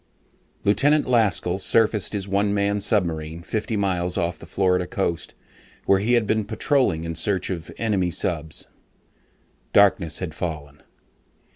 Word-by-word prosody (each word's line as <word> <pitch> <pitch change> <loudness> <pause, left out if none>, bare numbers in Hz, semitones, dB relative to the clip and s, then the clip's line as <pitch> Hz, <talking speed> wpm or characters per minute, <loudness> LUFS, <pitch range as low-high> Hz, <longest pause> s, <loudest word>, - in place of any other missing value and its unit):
_] - - -31
Lieutenant 145 +9 +3
Laskell 105 -6 +1
surfaced 110 0 +2
his 100 -2 -3
one 100 +1 +1
man 100 0 +1
submarine 85 -6 -1
fifty 110 +3 -2
miles 90 -3 -1
off 85 0 -1
the - - -12
Florida 90 -2 +1
coast 85 -2 -3 0.5
where 95 - +4
he 110 +5 +1
had 120 -3 +3
been 110 +1 +1
patrolling 110 - 0
in 85 0 -4
search 90 +4 0
of 85 -3 -5
enemy 100 -6 0
subs. 80 -4 -2 1.1
Darkness 95 -5 +4
had 90 -4 -4
fallen. 75 -4 -6
95 Hz, 140 wpm, -23 LUFS, 85-105 Hz, 1.1 s, where